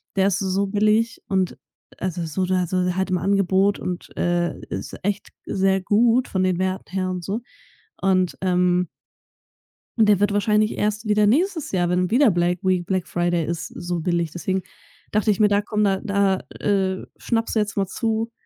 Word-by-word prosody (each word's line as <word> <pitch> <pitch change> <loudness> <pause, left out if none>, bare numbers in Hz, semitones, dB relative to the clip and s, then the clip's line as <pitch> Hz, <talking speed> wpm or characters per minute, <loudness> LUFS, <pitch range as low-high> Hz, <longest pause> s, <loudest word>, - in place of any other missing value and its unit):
der 195 0 +3
ist 200 -1 +1
so 195 +1 0
billig.“ 215 +3 +1
Und 190 -2 0 0.4
also, 175 -2 -3
so 160 +4 -3
oder 185 -1 +1
so 180 0 0
halt 190 0 -1
im 180 - +2
Angebot. 195 +1 +2
Und, 180 -1 -5
äh, 175 0 0
ist - - -5
echt 205 +1 -2 0.2
sehr 195 0 +1
gut 230 +5 +3
von 190 -1 0
den 185 -2 +1
Werten 185 0 -2
her 185 -1 -1
und 180 -1 -4
so. 205 +6 -3 0.6
Und, 185 -2 +2
ähm 180 -1 +2 1.1
Und 225 - +5
der 205 -3 +5
wird 205 0 +2
wahrscheinlich 210 +1 +2
erst 210 +1 -1
wieder 210 0 +3
nächstes 320 - +1
Jahr, 175 -2 +1
wenn 180 0 +1
wieder 250 -1 +5
Black 175 0 +1
Week, 185 -2 +1
Black 185 -1 -1
Friday 175 -1 0
ist 170 0 -3
so 175 0 -4
billig. 170 -1 -1
Deswegen 185 +2 -2 0.5
dachte 215 0 +2
ich 205 - -1
mir: 210 -1 +5
„Da 205 0 +3
komm 210 0 -1
da 195 -2 +2
da, 200 -3 +1 0.2
äh, 190 -2 0
schnappst 225 -1 -1
du - - +3
jetzt 210 +1 -1
mal 195 -2 +1
zu. 225 +2 -2
190 Hz, 185 wpm, -23 LUFS, 180-210 Hz, 1.1 s, Und